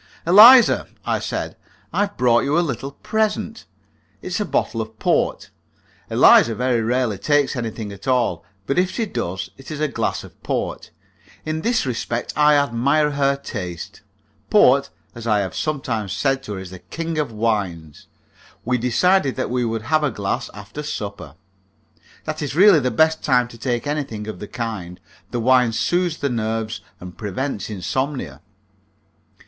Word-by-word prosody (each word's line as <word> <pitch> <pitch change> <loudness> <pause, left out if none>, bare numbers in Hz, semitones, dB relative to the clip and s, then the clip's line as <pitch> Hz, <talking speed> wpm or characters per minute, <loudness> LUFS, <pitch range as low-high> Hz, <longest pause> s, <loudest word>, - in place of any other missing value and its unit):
"Eliza," 225 +8 +8 0.2
I - - 0
said, - - -4 0.4
"I - - -1
have 205 0 -1
brought 120 -2 +4
you 145 +3 +1
a 175 - +2
little 135 +1 -4
present. 220 +1 -1 0.6
It - - -5
is 180 - -2
a - - 0
bottle 115 - -1
of 110 0 -8
port." - - 0 0.6
Eliza 115 - +6
very 125 0 +1
rarely 115 -3 0
takes 145 +6 +2
anything 110 -3 -4
at 100 +6 -11
all, 120 -10 +1 0.2
but 140 - +1
if 180 0 +2
she 225 +3 -2
does 95 - -4
it 135 - -12
is 155 -2 -5
a 155 - +1
glass - - -2
of - - -15
port. - - -3 0.6
In 155 0 -2
this 230 -2 +1
respect 120 -1 -3
I 150 0 +5
admire 140 +2 +2
her 140 -1 +1
taste. 90 - -7 0.5
Port, - - +5 0.2
as 115 0 -8
I 105 -2 +3
have 95 -2 -4
sometimes 115 - -2
said 135 +2 0
to 105 - -5
her, 95 - -5
is 95 -1 -9
the 95 - -9
king 160 - -4
of 145 -6 -1
wines. 100 -9 -3 0.6
We 125 +1 +1
decided 135 - +2
that - - -3
we 125 0 0
would 115 -1 -2
have 155 +4 +1
a 150 - +2
glass 100 -4 -3
after 105 +7 -8
supper. 105 - -6 0.9
That - - -4
is 145 -1 -3
really 190 -1 +7
the 130 -2 0
best 160 +7 +2
time 125 -3 +3
to 115 - -12
take 120 +1 -2
anything 140 -8 -3
of 110 -4 -7
the 105 - -7
kind; 100 -7 -5 0.3
the 120 - -3
wine 125 -1 +3
soothes 175 +6 0
the 140 - -1
nerves 110 -2 -2 0.2
and 90 -1 -10
prevents 105 +1 -4
insomnia. 110 - -3
125 Hz, 170 wpm, -21 LUFS, 110-150 Hz, 0.9 s, Eliza